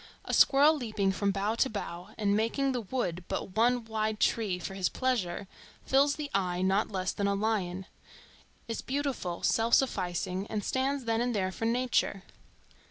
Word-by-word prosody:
A - - -4
squirrel 290 +3 +6
leaping 215 -8 -1
from 200 +1 0
bough 200 +2 0
to 265 +3 +1
bough 180 -4 -6
and 205 -2 +1
making 230 +6 +1
the 250 -2 -2
Wood 185 -6 -3
but 185 - -4
one 240 +1 +3
wide 220 -1 -2
tree 210 -4 +1
for 180 - -6
his 190 -1 0
pleasure, 200 -8 -1 0.4
fills 280 +2 +3
the 300 -2 -5
eye 180 -2 0
not 190 +3 +2
less 185 -2 -1
than 200 - -1
a 200 - +1
lion,—is 200 +2 -5
beautiful, 265 -11 -3
self 230 +1 +3
sufficing, 185 -5 -1
and 210 -2 -3
stands 265 +3 -1
then 225 0 +1
and 245 -1 0
there 190 -2 0
for 225 - -4
nature. 235 -4 +1
215 Hz, 165 wpm, -30 LUFS, 190-245 Hz, 0.4 s, squirrel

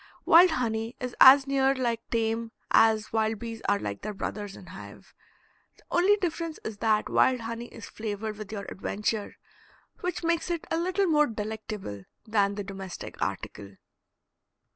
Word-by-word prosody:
Wild 350 +3 +8
honey 230 -5 -2
is 250 -1 -5
as 270 +1 +9
near 270 -1 +2
like 235 -3 -1
tame 225 0 -1 0.2
as 220 -1 +4
wild 220 0 +1
bees 230 0 -7
are 205 - +3
like 100 - -5
their 210 - -5
brothers 205 0 -5
in - - -12
hive. 185 +2 -12 0.6
The - - -23
only 370 +4 +4
difference 335 -4 -3
is 215 -2 -6
that 215 -1 +2
wild 255 -2 +3
honey 230 +1 -5
is 225 - -11
flavored 215 0 -5
with 215 0 -8
your 200 -2 -5
adventure, 210 +2 -3 0.6
which 360 -1 -3
makes 335 +1 0
it 340 -2 -2
a 325 - +1
little 370 +3 +1
more 300 -4 +4
delectable 210 - -6 0.2
than 205 -2 +1
the 205 - -4
domestic 195 -2 -8
article. 100 0 -4
225 Hz, 160 wpm, -27 LUFS, 205-270 Hz, 0.6 s, as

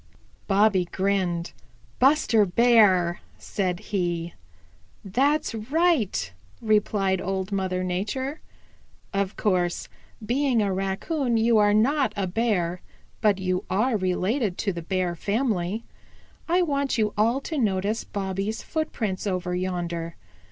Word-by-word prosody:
Bobby 195 -2 +3
grinned. 185 -2 -1 0.5
"Buster 260 -5 +4
Bear," 195 -4 +4 0.2
said 180 -3 -2
he. 175 -3 -1 0.7
"That's 270 +9 +1
right," 230 - 0 0.3
replied 200 -3 +1
Old 190 +1 -3
Mother 185 -2 -1
Nature. 220 - -3 0.7
"Of 195 0 -1
course, 180 -4 0 0.4
being 255 +1 +1
a 200 -2 +1
Raccoon, 225 - -1
you 225 0 +4
are 205 0 +4
not 260 +1 +2
a 200 -2 -1
Bear, 180 -3 0 0.4
but 210 -3 +3
you 185 -1 -1
are 220 +6 +1
related 190 +2 0
to 200 - -1
the 170 - -5
Bear 180 0 -1
family. 210 0 -1 0.7
I 360 +2 +3
want 280 -5 0
you 215 -2 +1
all 230 +5 +2
to 310 +1 -3
notice 205 -1 0
Bobby's 195 +2 -3
footprints 220 - -3
over 180 -2 -2
yonder. 175 -2 -3
200 Hz, 115 wpm, -25 LUFS, 185-230 Hz, 0.7 s, Buster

